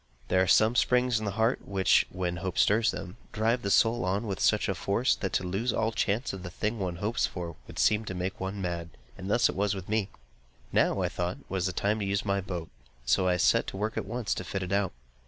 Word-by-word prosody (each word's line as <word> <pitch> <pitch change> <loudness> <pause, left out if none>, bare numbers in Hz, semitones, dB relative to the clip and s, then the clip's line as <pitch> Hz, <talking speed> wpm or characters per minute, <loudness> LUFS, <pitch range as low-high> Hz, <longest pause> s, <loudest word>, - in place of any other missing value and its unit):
There 95 - +3
are 95 - +2
some 110 +6 +5
springs 125 -1 +3
in 110 - -4
the 100 - -2
heart 115 +3 +1
which, 95 -2 +3
when 90 -1 -3
hope 90 +1 -4
stirs 110 +2 +4
them, 90 +5 -5
drive 115 +3 +1
the 100 - -2
soul 115 +4 +3
on 100 +5 0
with 100 -3 -3
such - - +3
a - - +1
force, 115 +6 +1
that 95 - -3
to - - +1
lose 100 +7 -1
all 110 0 0
chance 110 +3 -1
of 95 - -6
the 90 - -6
thing 105 +5 -2
one 90 -3 -2
hopes 105 +7 0
for, 85 -3 -6
would - - -11
seem 110 +1 +3
to 95 - -5
make 90 +1 -3
one 95 +2 -4
mad; 85 -2 -3 0.3
and 95 +1 -7
thus 120 +3 +4
was 100 +1 0
it - - -5
with 95 - -8
me. 110 -2 0 0.6
Now, - - +2
I - - +2
thought, 90 +1 -3
was 95 -1 0
the - - -1
time 100 +4 0
to 100 - -2
use 100 +1 -1
my 100 -1 +1
boat; 90 -4 -5 0.4
so 95 +8 +3
I 90 -1 +2
set 85 - +3
to - - -5
work 110 +2 -2
at - - -3
once 115 -1 -2
to - - -4
fit 95 -1 -3
it 90 - -5
out. 100 -1 +1
100 Hz, 250 wpm, -29 LUFS, 90-110 Hz, 0.6 s, some